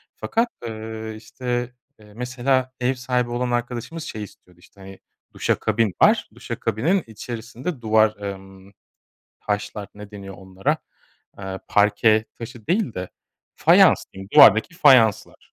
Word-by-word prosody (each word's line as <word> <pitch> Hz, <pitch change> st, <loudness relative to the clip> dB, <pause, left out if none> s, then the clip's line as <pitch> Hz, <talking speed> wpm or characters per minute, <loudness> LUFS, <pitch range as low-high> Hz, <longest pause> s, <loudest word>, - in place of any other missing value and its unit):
Fakat, 230 Hz, +2 st, 0 dB, 0.2 s
ııı, 110 Hz, 0 st, -6 dB
işte, 120 Hz, +2 st, -4 dB, 0.3 s
eee, 105 Hz, -1 st, -17 dB
mesela 130 Hz, +1 st, -1 dB
ev 125 Hz, +1 st, +1 dB
sahibi 125 Hz, -1 st, -1 dB
olan 120 Hz, +1 st, -2 dB
arkadaşımız, 120 Hz, +6 st, -3 dB
şey 110 Hz, -9 st, -6 dB
istiyordu, 90 Hz, -3 st, -16 dB
işte, 100 Hz, +3 st, -20 dB
hani, 95 Hz, 0 st, -12 dB, 0.3 s
duşakabin 110 Hz, -2 st, 0 dB
var. -, -, +4 dB
Duşakabinin 150 Hz, -, -1 dB
içerisinde 120 Hz, -, -7 dB
duvar, 110 Hz, -1 st, +3 dB
ımm, 95 Hz, -1 st, -9 dB, 0.7 s
taşlar 105 Hz, 0 st, -4 dB
ne 105 Hz, 0 st, -11 dB
deniyor 100 Hz, -2 st, -9 dB
onlara, 95 Hz, 0 st, -2 dB, 0.6 s
ııı, 95 Hz, -1 st, -6 dB
parke 110 Hz, +1 st, +3 dB
taşı 115 Hz, -1 st, -10 dB
değil 185 Hz, -, 0 dB
de, 90 Hz, 0 st, -5 dB, 0.5 s
fayans -, -, +5 dB
diyeyim, 95 Hz, 0 st, -10 dB
duvardaki 110 Hz, -, +7 dB
fayanslar. 130 Hz, -, +3 dB
110 Hz, 125 wpm, -22 LUFS, 105-125 Hz, 0.7 s, duvardaki